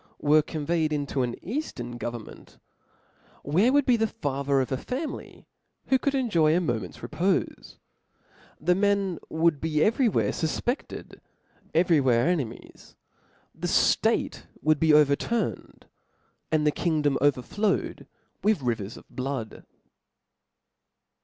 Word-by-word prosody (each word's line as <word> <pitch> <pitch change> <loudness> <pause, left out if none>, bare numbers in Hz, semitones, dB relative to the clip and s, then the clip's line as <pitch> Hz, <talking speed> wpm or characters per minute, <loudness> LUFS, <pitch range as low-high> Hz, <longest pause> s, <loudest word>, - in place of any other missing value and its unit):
were 150 +1 +4
conveyed 155 +1 -1
into 145 -2 -1
an 120 -1 -1
eaftern 130 - -5
government, 120 -2 -8 0.9
wbcce 185 - +3
would 285 0 +3
be 240 -3 +3
t4ie 225 0 +1
father 140 -2 -1
of 130 - -1
a 130 - 0
family 270 - -6 0.4
who 265 - +4
could 280 - 0
tnjof 170 -12 +3
a - - +3
moment's 110 - -3
repofe? 165 - -2 0.8
the 175 +4 +2
men 195 -2 +1
would 160 -2 +1
be 155 -1 +1
every 230 +3 +3
where - - +1
fufpefted, 235 - -3 0.6
every 170 -1 +4
whe^e 130 -3 +3
enemies; 145 -10 -4 0.6
the - - -4
ftate - - +2 0.2
would 155 -1 +3
be 160 -1 +4
overturned, 150 +10 +1 0.7
and 155 -1 +2
<he 150 - +4
jkingdpm 150 -3 +1
overflowed 145 - 0 0.3
witk 215 0 +3
rivers 115 -5 -3
of - - -15
blood. 130 -4 -5
155 Hz, 120 wpm, -26 LUFS, 135-195 Hz, 0.9 s, were